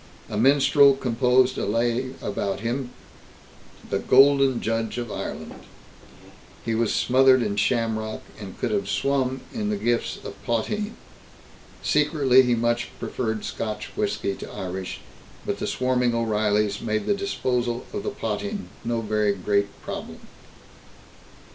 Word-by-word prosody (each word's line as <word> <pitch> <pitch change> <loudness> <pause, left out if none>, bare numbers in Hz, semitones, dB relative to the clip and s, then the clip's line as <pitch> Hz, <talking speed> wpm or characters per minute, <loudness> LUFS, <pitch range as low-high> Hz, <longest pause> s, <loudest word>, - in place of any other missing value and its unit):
A - - -3
minstrel 140 +3 +5
composed 125 0 +2
a - - -1
lay 120 +4 0
about 100 -1 -2
him, 125 +3 -2 1.0
"The - - +1
Golden 135 -1 +5
Judge 115 +1 -2
of 120 -3 -4
Ireland"; - - -6 1.1
he 115 - 0
was 115 -1 +1
smothered 130 0 +4
in 100 - -1
shamrock, 110 0 0 0.2
and 100 -3 -9
could - - -1
have 205 -1 -1
swum 130 -1 0
in 215 -3 -2
the 210 - 0
gifts 120 -10 0
of - - -9
potheen. 210 - -1 0.9
Secretly 145 -4 +4
he 125 -2 +2
much 120 +1 0
preferred 110 -3 -3
Scotch 110 0 -5
whisky 205 - -1
to - - -8
Irish, 95 0 -5 0.4
but - - -2
the - - -2
swarming 125 -2 +1
O'Reillys 105 -2 +1
made 110 -1 -1
the 205 - +2
disposal 125 -11 -1
of 205 - -2
the - - -2
potheen 205 0 -4
no 115 -1 -1
very 105 -1 +1
great 100 +1 +1 0.2
problem. - - -6
120 Hz, 135 wpm, -24 LUFS, 110-135 Hz, 1.1 s, minstrel